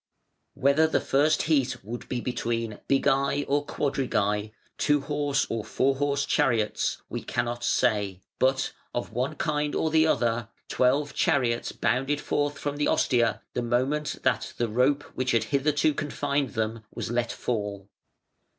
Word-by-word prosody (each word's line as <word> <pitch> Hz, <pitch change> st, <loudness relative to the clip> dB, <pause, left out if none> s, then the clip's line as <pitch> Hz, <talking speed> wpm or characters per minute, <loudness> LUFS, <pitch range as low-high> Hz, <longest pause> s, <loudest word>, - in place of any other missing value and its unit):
Whether 140 Hz, +3 st, +4 dB
the 160 Hz, -, +1 dB
first 145 Hz, +3 st, +2 dB
heat 135 Hz, -9 st, +1 dB
would 120 Hz, +3 st, -7 dB
be 125 Hz, -2 st, -2 dB
between 115 Hz, -3 st, -2 dB
bigæ 140 Hz, +1 st, +2 dB
or 145 Hz, +1 st, +1 dB
quadrigæ 110 Hz, -8 st, -1 dB, 0.3 s
(two 145 Hz, -1 st, +3 dB
horse 145 Hz, -1 st, 0 dB
or 115 Hz, -2 st, -3 dB
four 135 Hz, +4 st, +1 dB
horse 140 Hz, 0 st, 0 dB
chariots), 115 Hz, -7 st, +1 dB
we -, -, -4 dB
cannot 120 Hz, 0 st, -2 dB
say; 105 Hz, -7 st, +1 dB, 0.2 s
but, 135 Hz, +1 st, +2 dB, 0.2 s
of 120 Hz, -2 st, -3 dB
one 125 Hz, +4 st, -1 dB
kind 150 Hz, -2 st, -1 dB
or 160 Hz, -, 0 dB
the 160 Hz, 0 st, +4 dB
other, 120 Hz, -5 st, +1 dB, 0.2 s
twelve 140 Hz, +3 st, +2 dB
chariots 130 Hz, -8 st, +1 dB
bounded 130 Hz, +5 st, 0 dB
forth 145 Hz, 0 st, -1 dB
from 145 Hz, 0 st, -3 dB
the 150 Hz, -, +1 dB
ostia 115 Hz, -5 st, +2 dB
the -, -, -1 dB
moment 130 Hz, +5 st, 0 dB
that -, -, 0 dB
the 120 Hz, -, 0 dB
rope 130 Hz, +6 st, +2 dB
which 130 Hz, 0 st, -1 dB
had 115 Hz, -, +3 dB
hitherto 150 Hz, +2 st, +2 dB
confined 145 Hz, -1 st, -2 dB
them 110 Hz, 0 st, -2 dB
was -, -, -5 dB
let 120 Hz, 0 st, 0 dB
fall. 100 Hz, -4 st, -3 dB
130 Hz, 150 wpm, -27 LUFS, 115-145 Hz, 0.3 s, Whether